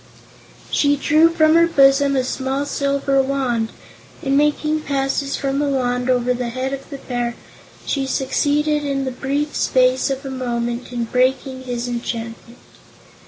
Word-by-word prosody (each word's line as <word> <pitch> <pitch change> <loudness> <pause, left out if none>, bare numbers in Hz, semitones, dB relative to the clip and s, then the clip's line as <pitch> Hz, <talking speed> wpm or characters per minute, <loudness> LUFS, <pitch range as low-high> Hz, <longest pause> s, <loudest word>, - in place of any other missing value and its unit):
She 285 0 +3
drew 310 +4 +4
from 315 -2 +3
her 335 0 +5
bosom 275 -3 +4
a 260 - +2
small 265 +2 -2
silver 275 -1 +1
Wand 260 -4 -1 0.5
and, 275 -2 +1
making 300 +1 +2
passes 275 -1 -2
with 275 0 0
the 295 - +1
Wand 250 -2 0
over 250 0 +2
the 245 -1 -3
head 260 +3 -3
of 275 0 -7
the 280 - -6
Bear, 245 -2 -3 0.5
she 275 -2 -1
succeeded 295 +3 0
in 275 -1 -1
the 260 - -2
brief 280 +4 -2
space 255 +1 +2
of 270 +1 -3
a 270 - -4
moment 240 -1 -3
in 240 -1 -2
breaking 260 +2 0
his 245 -1 -3
enchantment. 235 0 -5
270 Hz, 155 wpm, -20 LUFS, 250-280 Hz, 0.5 s, her